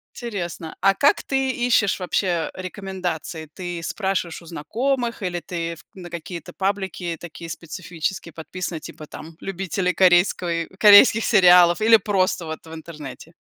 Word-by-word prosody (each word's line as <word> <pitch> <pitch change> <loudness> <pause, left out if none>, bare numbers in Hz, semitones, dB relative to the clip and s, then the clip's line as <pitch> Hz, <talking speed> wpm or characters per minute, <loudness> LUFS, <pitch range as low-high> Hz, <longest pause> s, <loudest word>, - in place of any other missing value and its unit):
Интересно. 180 -8 -5
А 195 +1 +5
как 285 +8 +3
ты 270 -1 0
ищешь 240 -6 +1
вообще 180 -2 -1
рекомендации? 185 -4 -5
Ты 175 -2 -5
спрашиваешь 190 -1 -2
у - - -15
знакомых, 235 - -2
или 175 -1 -2
ты 170 -2 -5
в - - -17
на 180 -2 -9
какие-то 170 0 -7
паблики 190 -3 -2
такие 170 0 -9
специфические 170 +1 -5
подписана, 170 +1 -6
типа, 155 0 -10
там, 160 +2 -11
"Любители 190 -1 -2
корейской 175 -2 +3
корейских 210 +1 +8
сериалов", 180 -4 +6
или 225 +1 +7
просто 190 -3 0
вот 160 0 -7
в 160 - -11
интернете? 160 -1 -10
180 Hz, 140 wpm, -22 LUFS, 165-195 Hz, -, корейских